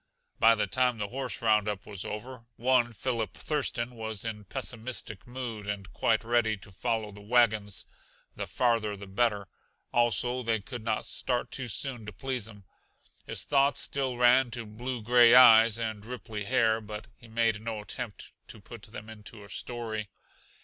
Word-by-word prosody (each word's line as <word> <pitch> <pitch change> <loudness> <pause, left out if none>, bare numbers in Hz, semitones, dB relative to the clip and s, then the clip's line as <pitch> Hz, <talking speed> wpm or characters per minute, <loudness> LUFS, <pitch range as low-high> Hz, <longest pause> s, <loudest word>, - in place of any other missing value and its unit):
By 115 0 +7
the 105 - +1
time 125 -2 +1
the 105 -1 -3
horse 130 -1 -4
roundup 105 -3 +2
was 100 -3 -6
over, 115 +3 -7
one 120 0 +3
Philip 115 -3 -2
Thurston 130 -5 -2
was 110 -2 -4
in 105 -2 -5
pessimistic 120 -3 -5
mood 120 -5 -6
and 100 -3 -5
quite 110 +3 +2
ready 115 -2 +2
to 100 - -14
follow 110 +2 -2
the 105 0 -12
wagons, 110 -3 +2 0.5
the - - -4
farther 115 -4 +1
the 100 - -9
better. 100 0 0 0.5
Also, 120 +1 +2
they 115 -2 +1
could 120 +2 -8
not 110 -1 -1
start 125 -1 -1
too 130 -2 -4
soon 120 -1 -2
to - - -5
please 125 +1 -3
him. 105 -3 -13 0.6
His - - -2
thoughts 140 0 +3
still 135 -3 -1
ran 125 +1 +5
to 120 -1 -5
blue 120 +3 -5
gray 120 +1 +7
eyes 115 -3 +8
and 110 -3 -3
ripply 115 -3 -6
hair, 115 -2 +2
but 105 0 -7
he 120 - -16
made 115 -1 +1
no 110 -1 -4
attempt 110 +1 -7
to 110 - -9
put 115 +2 -11
them 105 0 -10
into 110 -1 -9
a 100 - -14
story. 110 -1 -4
115 Hz, 170 wpm, -29 LUFS, 105-125 Hz, 0.6 s, eyes